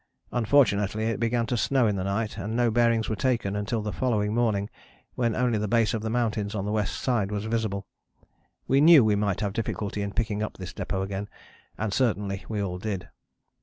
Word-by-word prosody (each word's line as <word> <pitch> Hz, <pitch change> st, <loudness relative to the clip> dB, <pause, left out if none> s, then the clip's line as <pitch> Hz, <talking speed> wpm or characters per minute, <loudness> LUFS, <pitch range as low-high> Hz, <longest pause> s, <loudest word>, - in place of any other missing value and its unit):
Unfortunately 110 Hz, -4 st, +2 dB
it 115 Hz, -2 st, -1 dB
began 115 Hz, 0 st, +1 dB
to 120 Hz, -, -1 dB
snow 130 Hz, +2 st, +2 dB
in 105 Hz, -2 st, +1 dB
the 95 Hz, -, -2 dB
night 105 Hz, +2 st, -2 dB
and 105 Hz, +2 st, -4 dB
no 120 Hz, -1 st, +2 dB
bearings 115 Hz, -1 st, +2 dB
were 110 Hz, -, -1 dB
taken 115 Hz, -3 st, 0 dB
until 105 Hz, +2 st, -2 dB
the 105 Hz, -, -3 dB
following 105 Hz, -5 st, 0 dB
morning 110 Hz, -4 st, +1 dB, 0.5 s
when 120 Hz, -3 st, 0 dB
only 125 Hz, -3 st, +1 dB
the 105 Hz, -, -1 dB
base 115 Hz, -1 st, +2 dB
of 110 Hz, -, -1 dB
the 110 Hz, -, -3 dB
mountains 110 Hz, -3 st, -1 dB
on 100 Hz, -1 st, -2 dB
the 105 Hz, -, -2 dB
west 105 Hz, -2 st, -1 dB
side 115 Hz, -7 st, 0 dB
was 105 Hz, 0 st, -3 dB
visible. 110 Hz, -3 st, -2 dB, 0.8 s
We 135 Hz, +2 st, +4 dB
knew 155 Hz, -5 st, +8 dB
we 105 Hz, -1 st, +3 dB
might 100 Hz, -2 st, 0 dB
have 100 Hz, -2 st, -1 dB
difficulty 105 Hz, -2 st, -3 dB
in 100 Hz, 0 st, -3 dB
picking 110 Hz, -3 st, -1 dB
up 110 Hz, -, -4 dB
this 90 Hz, -3 st, -7 dB
depôt 95 Hz, -1 st, -2 dB
again, 100 Hz, +1 st, -4 dB, 0.5 s
and 105 Hz, -2 st, -2 dB
certainly 100 Hz, -5 st, 0 dB
we 110 Hz, -2 st, -2 dB
all 90 Hz, -2 st, -4 dB
did. 100 Hz, -2 st, -4 dB
110 Hz, 205 wpm, -26 LUFS, 100-115 Hz, 0.8 s, knew